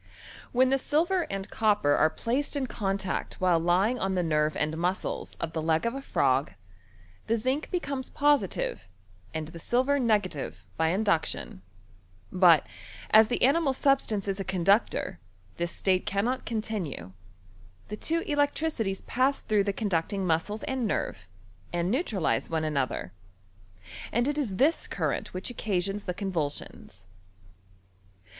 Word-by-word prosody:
When 255 +1 +3
the 270 - +3
silver 340 +6 +1
and 195 0 -4
copper 210 -9 +2
are 155 - +4
placed 250 - -2
in 280 -2 0
contact 195 -5 -2
while 180 -2 +3
lying 185 +9 +2
on 190 0 0
the 180 - +1
nerve 155 -1 +1
and 155 +1 0
mus 180 +3 -1
cles - - -5
of 165 - -4
the 160 - -2
leg 160 +3 +1
of 235 - 0
a 275 - -5
frog, 135 - +1 0.7
the 230 - +2
zinc 260 +7 -1
becomes 280 -7 -3
positive, 260 - +1 0.4
and 160 -1 -4
the 170 - -10
silver 260 - +1
negative, 185 - -1
by 160 - +1
induction; 170 - 0 0.7
but, 175 -4 +6 0.5
as 220 0 +8
the 240 - 0
animal 280 +1 +4
substance 260 -7 +1
is 195 0 -2
a - - -1
conductor, 190 - +1 0.4
this 170 0 -2
state 185 -1 0
cannot 235 +7 -1
continue: 210 - -3 0.8
the 210 - -3
two 330 +9 -1
electricities 290 - 0
pass 265 +3 0
through 210 -2 +2
the 200 - +1
con 205 +1 -3
ducting 180 +3 0
muscles 185 +4 0
and 260 -4 -1
nerve, 100 - -3 0.4
and 175 +2 0
neutralize 230 - 0
one 160 -1 -1
ano 140 -4 +1
ther. - - -6 1.0
And 240 +3 +1
it 295 +1 0
is 225 -10 -2
this 290 - +2
current - - -2
which 185 +6 -3
occasions 200 -3 -2
the 180 - -3
convulsions. 150 - -4
200 Hz, 150 wpm, -28 LUFS, 165-255 Hz, 1.0 s, as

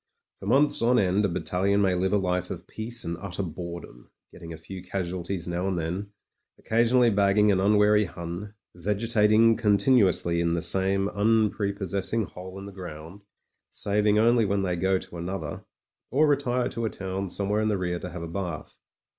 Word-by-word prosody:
For 95 - -8
months 140 +6 +4
on 120 +2 +3
end 100 0 +2
a - - 0
battalion 95 +3 0
may 95 -2 +2
live 95 +1 0
a 105 - +3
life 90 -2 -1
of - - -7
peace 115 +2 -6
and 85 - -3
utter 95 +2 -5
bore 85 0 -6
dom, - - -15 0.2
getting 85 - -11
a 80 - -7
few 90 +4 -9
casualties 90 -1 -4
now 90 +2 -2
and 95 -2 -1
then, 90 +5 -4 0.5
occa 115 +1 +1
sionally 120 -2 +3
bagging 100 +1 +4
an 95 - +2
unwary 105 +1 +4
Hun, 85 +4 -7 0.2
vegetating 110 +4 +3
con 105 -3 +2
tinuously 95 -6 +2
in 85 0 +1
the 85 - -1
same 95 +3 +3
tmprepossessing 100 -1 0
hole 95 +1 -10
in 100 - -8
the 100 - -8
ground 90 0 -9 0.3
— - - -52
saving 105 +1 +1
only 115 +1 +4
when 100 -1 0
they 90 -2 -1
go 95 +2 +1
to 90 - -9
another, 85 -3 -5 0.4
or 145 +5 +3
retire 125 -4 +1
to 115 0 -4
a - - 0
town 95 -1 -5
somewhere 100 +3 0
in 110 - 0
rear 90 -4 -1
to 90 - -6
have 90 -1 -7
a - - -5
bath. 85 -2 -6
100 Hz, 190 wpm, -26 LUFS, 90-105 Hz, 0.5 s, months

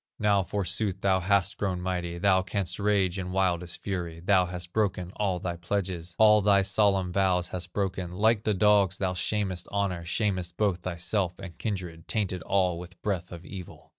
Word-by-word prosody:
"Now 100 -2 +3
forsooth 95 +1 -2
thou 95 -1 +3
hast 100 +1 +1
grown 95 -3 -1
mighty, 90 -1 -3
Thou 95 0 +3
canst 95 0 -3
rage 100 -3 +1
in 90 -1 -4
wildest 90 -2 -1
fury; 85 -4 -3
Thou 90 +1 +3
hast 90 -1 -6
broken 95 -4 0
all 95 -3 0
thy 85 -1 -4
pledges, 90 -1 -3
All 105 -1 +6
thy 100 -1 +4
solemn 95 -2 +2
vows 90 -2 +2
hast 90 -1 -5
broken, 95 -3 -2
Like 105 +4 +2
the 105 - +1
dogs 100 -1 +4
thou 95 -2 -1
shamest 95 -1 -1
honor, 100 -4 -1
Shamest 90 -1 -1
both 100 -4 +1
thyself 90 +1 -2
and 95 -3 -9
kindred, 90 -7 -4
Tainted 95 -4 -1
all 90 -1 +1
with 90 0 -11
breath 90 -4 -2
of 85 0 -9
evil. 95 -3 -10
95 Hz, 175 wpm, -28 LUFS, 90-100 Hz, -, All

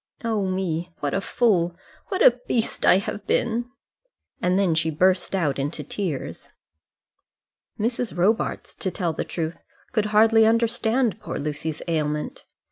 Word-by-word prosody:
Oh, 220 -4 0
me! 180 -2 -2
what 145 -1 -2
a 195 - 0
fool, 180 -7 +1 0.3
what 380 -3 0
a 245 0 +6
beast 230 -2 0
I - - +8
have 200 0 -4
been!" 235 +1 0 0.7
And 180 +1 +2
then 195 -4 +3
she 160 0 +1
burst 185 +4 +2
out 150 -7 0
into 145 +2 -3
tears. 160 -2 -4 1.3
Mrs. 230 -1 -1
Robarts, 205 +6 0
to 190 - -3
tell 175 -2 -2
the - - -2
truth, 165 -1 -4 0.3
could 215 -3 +1
hardly 220 +1 +5
understand 230 0 +1
poor - - -5
Lucy's 150 +1 -4
ailment. 150 -2 -2
190 Hz, 140 wpm, -24 LUFS, 160-225 Hz, 1.3 s, I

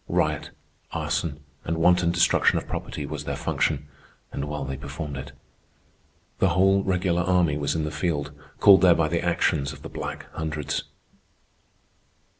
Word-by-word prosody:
Riot, - - 0 0.4
arson, 75 -2 -2 0.2
and 85 0 -2
wanton 90 +1 +4
destruction 85 0 +3
of - - -4
property 75 - -5
was 75 0 -6
their - - -2
function, 70 +1 -1 0.4
and 70 - -3
well 75 -2 -3
they 70 0 -4
performed 70 +2 -6
it. 70 0 -7 1.1
The 95 - +4
whole 95 +3 +4
regular 90 -2 +1
army 90 -4 +2
was 75 0 -1
in 80 - 0
the 75 - -3
field, 75 -2 -2 0.3
called 100 -2 +8
there 90 -2 +6
by 80 -2 +1
the 85 +1 0
actions 75 -5 +1
of - - -13
the - - -7
Black - - -6
Hundreds. 75 -2 -3
80 Hz, 155 wpm, -25 LUFS, 75-90 Hz, 1.1 s, called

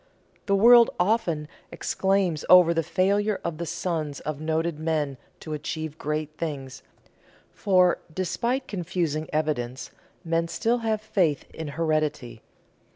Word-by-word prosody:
The 200 - +3
world 235 +3 +7
often 180 -6 +1 0.2
exclaims 190 -5 0
over 180 -2 +7
the 165 - +1
failure 200 +5 +1
of 170 -2 -4
the 170 - -3
sons 155 -6 -3
of 155 -1 -5
noted 160 0 -1
men 155 -4 -1 0.2
to 155 - -6
achieve 155 +1 -5
great 150 0 -3
things, 140 -6 -5 0.7
for, 185 -3 +3
despite 235 +10 -2
confusing 165 -5 -2
evidence, 140 -5 -2 0.3
men 165 0 0
still 230 +8 0
have 220 -2 -1
faith 175 -9 0
in 160 - -6
heredity. 155 -8 -1
165 Hz, 125 wpm, -25 LUFS, 155-190 Hz, 0.7 s, world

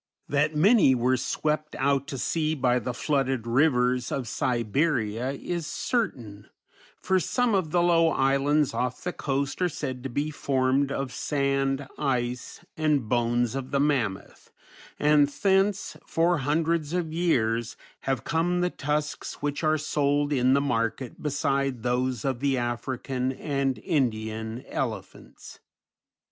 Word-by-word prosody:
That 150 +2 +1
many 180 - +5
were 125 +1 +2
swept 150 +4 -2
out 140 0 +1
to 140 -2 -5
sea 155 +3 0
by 125 -3 +2
the 125 +2 -3
flooded 135 -2 -1
rivers 125 -1 +2
of 130 -4 -2
Siberia 125 0 0
is 170 +3 -4
certain, 115 - -3 0.5
for 190 0 +2
some 245 +4 +1
of 185 -5 +1
the 175 +2 +2
low 170 -1 +4
islands 140 +1 +2
off 125 0 -2
the 180 +1 -2
coast 140 +3 -2
are 180 - +3
said 130 -5 -5
to 135 - -5
be 145 +5 -2
formed 135 -1 +1
of 135 -1 -3
sand, 135 -1 0
ice, 125 -3 -2
and 150 -6 +1
bones 120 0 +1
of 135 -1 -4
the 140 0 0
mammoth, 130 -10 -1 0.5
and 150 -1 +4
thence, 195 +5 +1
for 170 0 +2
hundreds 155 +2 0
of 170 -3 -2
years, 115 -9 0 0.2
have 135 -4 -2
come 175 +2 0
the 180 0 +1
tusks 150 +1 -3
which 145 +2 -2
are 155 0 +3
sold 145 -1 0
in 130 0 +3
the - - +4
market 115 -2 -2
beside 140 -4 -1
those 125 0 -1
of 130 -3 -1
the 135 0 +1
African 125 +2 -2
and 135 -2 -1
Indian 110 - -2
elephants. - - -6
140 Hz, 140 wpm, -26 LUFS, 125-155 Hz, 0.5 s, many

